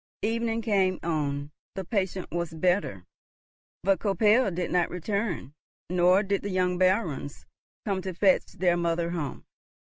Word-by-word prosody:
Evening 230 +1 0
came 195 -4 +2
on, 145 -3 -2 0.2
the 190 -1 -4
patient 190 -2 -2
was 170 -1 -3
better, 170 - 0 0.8
but 195 +1 +3
Koppel 215 +3 +3
did 180 -1 -3
not 175 -1 +2
return, 180 - -3 0.4
nor 180 +2 +4
did 200 -1 0
the 205 - -4
young 180 -1 0
Barons 185 -7 0 0.4
come 195 -2 -1
to 185 0 -4
fetch 190 +1 +3
their 180 -2 +2
mother 170 0 0
home. 160 -5 -4
185 Hz, 140 wpm, -27 LUFS, 170-200 Hz, 0.8 s, nor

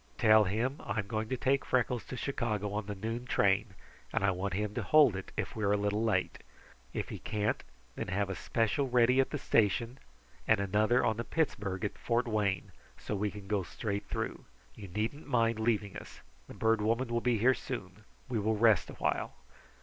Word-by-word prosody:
Tell 110 -1 +6
him 115 +8 -1
I'm 100 +1 -2
going 110 +1 -3
to 130 - -1
take 135 +3 +1
Freckles 125 -1 0
to 130 - -6
Chicago 110 -7 -2
on 105 -1 -3
the 105 - -4
noon 115 +5 -4
train, 100 -1 +2 0.4
and - - 0
I 100 - +4
want 95 +1 -2
him 105 +1 -2
to 120 - -2
hold 140 0 +5
it 95 - -6
if - - -3
we 110 - -3
are 100 0 +3
a - - +3
little 105 +2 0
late. 100 -5 0 0.5
If - - -3
he - - -6
can't, 105 +1 -1 0.3
then - - -5
have 100 +1 0
a 95 - -3
special 115 +7 0
ready 125 +1 +4
at 135 - +3
the 145 - -3
station 115 +1 +1 0.5
and 110 - +4
another 105 +5 +2
on 110 - +1
the 115 - -2
Pittsburgh 100 - -1
at 105 - -4
Fort 120 +1 0
Wayne, 105 -4 0 0.3
so 105 - -4
we 105 +1 0
can 100 -1 -10
go 100 0 0
straight 100 +3 -4
through. - - -4 0.3
You 105 -3 -9
needn't 110 - -3
mind 115 -4 +2
leaving 110 -3 0
us. - - -10 0.3
The - - -10
Bird 110 -1 +2
Woman 115 +4 +1
will 120 0 0
be 120 -1 +2
here 125 +5 +4
soon. - - -7 0.2
We 120 -3 -1
will 110 +1 +1
rest 110 -3 +4
awhile." - - -2
110 Hz, 205 wpm, -31 LUFS, 100-120 Hz, 0.5 s, Tell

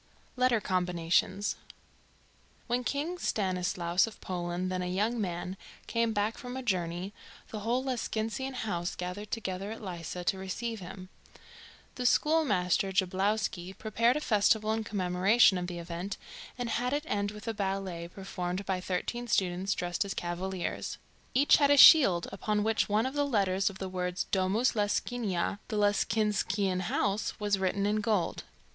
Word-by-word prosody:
LETTER 250 -2 +3
COMBINATIONS. 180 +1 0 1.1
When 245 +1 0
King 300 +8 -2
Stanislaus 180 - 0
of 225 - -10
Poland, 180 0 -3
then 185 0 -1
a 180 - -2
young 215 +6 0
man, 180 0 -3 0.3
came 230 -1 0
back 210 +1 -1
from 250 +1 -6
a 260 - -5
journey, 180 -2 -2 0.4
the 215 - -5
whole 235 +5 0
Lescinskian 255 0 -2
House 180 -7 -2
gathered 180 +4 -5
together 195 -2 -3
at 225 - -6
Lissa 175 -1 -5
to 190 +2 0
receive 220 +4 -4
him. 185 0 -9 0.9
The 250 -1 +1
schoolmaster, 205 - +2
Jablowsky, 190 0 0
prepared 230 +4 +2
a - - -3
festival 215 -2 +3
in 220 0 -1
commemoration 190 +1 +3
of 180 - -3
the 175 -1 -5
event, 175 +3 -5 0.4
and 245 -1 -2
had 245 +3 -1
it 295 +1 0
end 205 -7 -1
with 210 +2 -10
a 225 - 0
ballet 190 -4 -3
performed 185 0 -5
by 185 -1 -1
thirteen 235 +7 -3
students, 190 -2 +1
dressed 175 +2 -1
as 200 - -5
cavaliers. 175 +1 -3 0.4
Each 280 +3 +6
had 285 -2 +4
a 285 - +5
shield, 195 - +8
upon 210 +1 -1
which 220 0 +1
one 215 +3 +2
of 260 - -2
the 290 0 +1
letters 195 -8 +1
of 195 - -10
the 190 - -4
words 180 -1 -2
"Domus 195 +6 +2
Lescinia" 205 -2 -1
(The 215 - -3
Lescinskian 205 -2 +1
House) 200 +5 -1
was 205 -2 +1
written 195 +1 0
in 210 +1 +1
gold. 210 -4 0
200 Hz, 155 wpm, -30 LUFS, 185-225 Hz, 1.1 s, shield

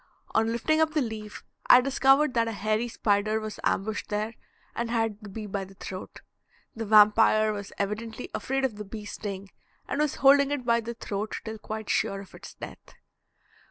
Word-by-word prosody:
On 225 +1 +2
lifting 310 +7 +1
up 315 -1 +2
the - - +4
leaf 220 -3 -6 0.2
I 250 - +9
discovered 270 +2 +3
that 230 -2 +2
a 225 - -3
hairy 215 +3 0
spider 215 -1 +1
was 215 -1 -6
ambushed 215 +2 -1
there 215 +2 -2 0.4
and 235 0 -2
had 225 -3 0
the 210 - -9
bee 215 +2 -6
by 200 -1 -3
the 195 +1 -13
throat. 185 0 -8 0.5
The 225 -1 -4
vampire 215 0 +6
was 200 -1 -6
evidently 220 +4 -3
afraid 270 0 -1
of 225 -6 -3
the 210 - -5
bee's 210 0 -8
sting, 200 -2 -6 0.4
and 290 - -1
was 300 -2 0
holding 280 0 +5
it 285 -3 -2
by 235 -1 +3
the 235 +1 -6
throat 210 -1 -4
till 220 -1 -6
quite 220 0 -6
sure 195 - 0
of 195 - -14
its - - -11
death. - - -11
220 Hz, 190 wpm, -27 LUFS, 210-235 Hz, 0.5 s, I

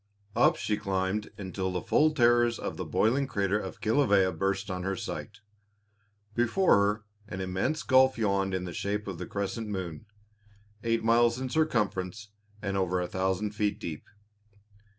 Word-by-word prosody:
Up - - +5
she 105 - -1
climbed 100 0 -1
until 95 -1 -3
the 90 - -1
full 155 +1 +4
terrors 120 -4 +3
of - - -4
the - - -4
boiling 130 +5 +2
crater 100 -3 0
of 95 -3 -7
Kilawea 100 -6 +3
burst 100 +1 -1
on 90 0 -3
her 95 +2 -1
sight. 95 - -6 0.9
Before 120 - +3
her 105 +1 +2 0.2
an 95 -3 -6
immense 95 +12 -1
gulf 130 -1 +5
yawned 100 -3 +1
in 90 - -2
the 90 -2 -6
shape 105 +3 -2
of 95 -4 -5
the 90 - -5
crescent 100 +3 -3
moon, 95 -2 -5 0.8
eight 115 -1 +1
miles 115 +1 +4
in 130 0 -3
circumference 105 - -1 0.3
and 100 -1 -2
over 90 -1 +1
a 90 - -1
thousand 95 +3 -1
feet 105 -1 -1
deep. 80 -3 -7
100 Hz, 160 wpm, -29 LUFS, 95-115 Hz, 0.9 s, Up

